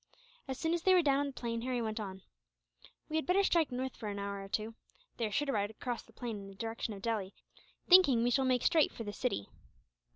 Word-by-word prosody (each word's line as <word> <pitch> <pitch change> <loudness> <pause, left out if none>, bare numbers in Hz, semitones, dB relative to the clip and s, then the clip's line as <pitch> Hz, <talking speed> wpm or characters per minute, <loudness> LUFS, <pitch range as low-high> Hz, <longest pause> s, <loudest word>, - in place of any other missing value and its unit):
As 265 -1 -4
soon 325 +2 0
as 345 - 0
they 375 +2 +5
were 355 - +5
down 280 -2 +3
on 285 - +1
the - - -4
plain, 230 -2 -3
Harry 250 0 -1
went 220 -1 -2
on: 190 -3 -6 0.8
"We 310 - -1
had 315 - -2
better 380 +2 +4
strike 335 -6 +2
north, 255 +1 -3
for 215 - -5
an 200 - -4
hour 200 0 -4
or 195 - -10
two. 215 +3 -2 0.4
They 230 - 0
are - - -7
sure 295 +8 +1
to 280 - -1
ride 205 -4 0
across 235 +2 -4
the - - -21
plain 230 -1 -5
in 195 - -9
the 195 - -11
direction 225 0 -4
of 195 - -11
Delhi, 210 -4 -2 0.5
thinking 305 -11 +7
we 245 - +2
shall 270 +2 +3
make 255 -1 +2
straight 315 -3 +4
for 230 - -7
the 205 -1 -5
city." 205 - -2
235 Hz, 255 wpm, -33 LUFS, 210-280 Hz, 0.8 s, thinking